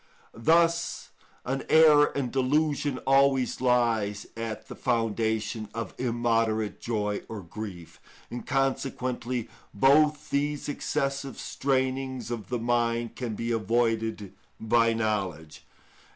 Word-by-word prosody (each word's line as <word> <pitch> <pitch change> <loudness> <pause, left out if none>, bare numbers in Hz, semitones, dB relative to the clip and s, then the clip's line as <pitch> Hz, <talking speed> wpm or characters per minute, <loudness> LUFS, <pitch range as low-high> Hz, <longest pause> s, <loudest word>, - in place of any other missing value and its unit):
Thus 165 +7 +1 0.3
an 135 +2 -1
error 155 -2 +7
and 130 -4 -1
delusion 145 +1 +1
always 135 -2 +3
lies 115 -5 +1
at 115 -1 -5
the - - -7
foundation 110 -2 -1
of 115 -4 -4
immoderate 115 -3 0
joy 105 -3 -2
or 110 -3 -6
grief, 90 -2 -8 0.3
and 120 - -5
consequently 130 -3 -1 0.3
both 150 +6 +3
these 145 +1 -1
excessive 140 -1 -2
strainings 130 -2 -2
of 115 -3 -5
the 125 - -1
mind 115 0 0
can 120 -4 -4
be 115 +2 -3
avoided 115 -2 0 0.3
by 115 +1 +3
knowledge. 95 -8 -3
120 Hz, 110 wpm, -27 LUFS, 110-135 Hz, 0.3 s, error